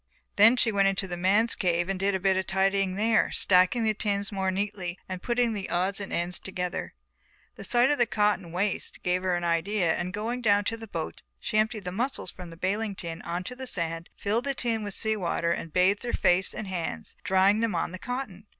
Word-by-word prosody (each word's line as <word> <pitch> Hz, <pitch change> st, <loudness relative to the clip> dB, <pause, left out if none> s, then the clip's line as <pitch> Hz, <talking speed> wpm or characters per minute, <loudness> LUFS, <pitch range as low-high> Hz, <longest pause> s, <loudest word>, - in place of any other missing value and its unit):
Then 225 Hz, +5 st, +7 dB
she 230 Hz, -, +2 dB
went 200 Hz, -1 st, +3 dB
into 195 Hz, 0 st, 0 dB
the 175 Hz, -, -4 dB
men's 200 Hz, +6 st, +3 dB
cave 175 Hz, -2 st, 0 dB
and 195 Hz, -1 st, -2 dB
did 195 Hz, 0 st, +1 dB
a -, -, -1 dB
bit 190 Hz, 0 st, +2 dB
of 190 Hz, 0 st, -1 dB
tidying 195 Hz, 0 st, +1 dB
there, 220 Hz, +2 st, +2 dB
stacking 185 Hz, +5 st, +3 dB
the 220 Hz, -1 st, +2 dB
tins 200 Hz, -1 st, -1 dB
more 190 Hz, -2 st, -1 dB
neatly 190 Hz, -2 st, -3 dB
and 185 Hz, -1 st, -5 dB
putting 240 Hz, -1 st, +1 dB
the 200 Hz, -3 st, -5 dB
odds 185 Hz, +3 st, +2 dB
and 200 Hz, -, -6 dB
ends 175 Hz, +1 st, -1 dB
together. 180 Hz, -2 st, -4 dB, 0.6 s
The -, -, -9 dB
sight 245 Hz, +1 st, +4 dB
of 290 Hz, -, +1 dB
the 240 Hz, -, +4 dB
cotton 210 Hz, -5 st, +1 dB
waste 190 Hz, +3 st, -1 dB
gave 180 Hz, 0 st, +1 dB
her 185 Hz, -1 st, +1 dB
an 175 Hz, -, -2 dB
idea 170 Hz, +1 st, +1 dB
and 180 Hz, -, -3 dB
going 225 Hz, +5 st, -3 dB
down 205 Hz, -3 st, +3 dB
to 225 Hz, -, -1 dB
the 225 Hz, 0 st, -9 dB
boat 165 Hz, -5 st, -5 dB, 0.2 s
she 215 Hz, -, 0 dB
emptied 215 Hz, -1 st, 0 dB
the 180 Hz, -, -4 dB
mussels 235 Hz, -2 st, -2 dB
from 180 Hz, -2 st, -10 dB
the 165 Hz, -, -12 dB
baling 200 Hz, +3 st, -1 dB
tin 165 Hz, -2 st, -6 dB
on 175 Hz, +2 st, -3 dB
to 250 Hz, -, -6 dB
the 260 Hz, 0 st, -6 dB
sand, 165 Hz, -5 st, -2 dB
filled 225 Hz, +5 st, -1 dB
the 275 Hz, -1 st, 0 dB
tin 230 Hz, -3 st, -1 dB
with 205 Hz, -2 st, -5 dB
sea 220 Hz, -1 st, 0 dB
water 170 Hz, -3 st, -1 dB
and 165 Hz, -, -3 dB
bathed 185 Hz, +4 st, +3 dB
her 240 Hz, -, -3 dB
face 180 Hz, +2 st, +2 dB
and 215 Hz, -, -5 dB
hands, 170 Hz, -, -4 dB
drying 190 Hz, +3 st, +3 dB
them 225 Hz, -4 st, 0 dB
on 165 Hz, -, -1 dB
the 185 Hz, -, -7 dB
cotton. 240 Hz, -5 st, -5 dB
195 Hz, 230 wpm, -27 LUFS, 180-215 Hz, 0.6 s, Then